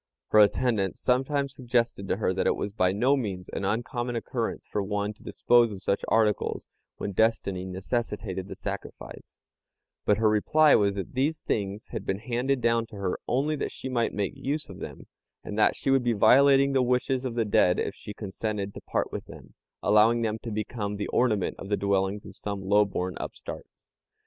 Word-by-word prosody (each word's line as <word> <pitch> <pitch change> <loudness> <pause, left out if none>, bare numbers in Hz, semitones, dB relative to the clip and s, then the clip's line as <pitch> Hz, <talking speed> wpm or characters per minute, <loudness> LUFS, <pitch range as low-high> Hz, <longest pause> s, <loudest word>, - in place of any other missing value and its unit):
Her 110 - +5
attendants 105 -2 +2
sometimes 135 +2 0
suggested 120 -6 -1
to - - 0
her 100 -3 0
that 95 - 0
it - - +3
was 100 - -4
by 90 -4 +2
no 125 +8 +3
means 95 -9 -4
an - - -4
uncommon 120 +4 -2
occurrence 115 0 -3
for 105 - -2
one 105 +1 -2
to 105 - -25
dispose 120 -2 +3
of 95 -1 -8
such 100 - 0
articles 110 -3 +1 0.3
when 100 - -3
destiny 100 -3 +1
necessitated 95 0 -3
the - - -7
sacrifice; - - -8 0.6
but 105 - +3
her 110 0 +3
reply 145 +9 +4
was 100 -1 +3
that 95 - -5
these 140 +5 0
things 100 0 -3
had - - -5
been 95 - -1
handed 125 +4 -1
down 115 -1 +2
to 110 - -12
her 100 -2 -2
only 145 +5 +1
that - - -3
she 130 - -6
might 120 -3 0
make 100 -2 -2
use 150 +3 -3
of - - -10
them, - - -8 0.4
and 105 - -6
that 105 - +4
she 135 - -1
would 135 -2 +3
be 120 -1 +2
violating 135 +5 +5
the 135 - +3
wishes 125 +1 +1
of 125 -3 -3
the 115 -2 +1
dead 90 -3 +3
if - - -1
she - - -9
consented 100 0 -4
to - - -9
part - - -2
with - - -5
them, - - -13 0.3
allowing 110 +3 +4
them 110 0 -1
to 115 - -6
become 105 -1 -3
the 100 - -3
ornament 110 -6 +1
of 95 - -8
the 105 - +1
dwellings 100 +1 0
of 100 - -11
some 100 -1 -5
lowborn 95 -2 +1
upstarts. - - -9
110 Hz, 195 wpm, -27 LUFS, 100-125 Hz, 0.6 s, Her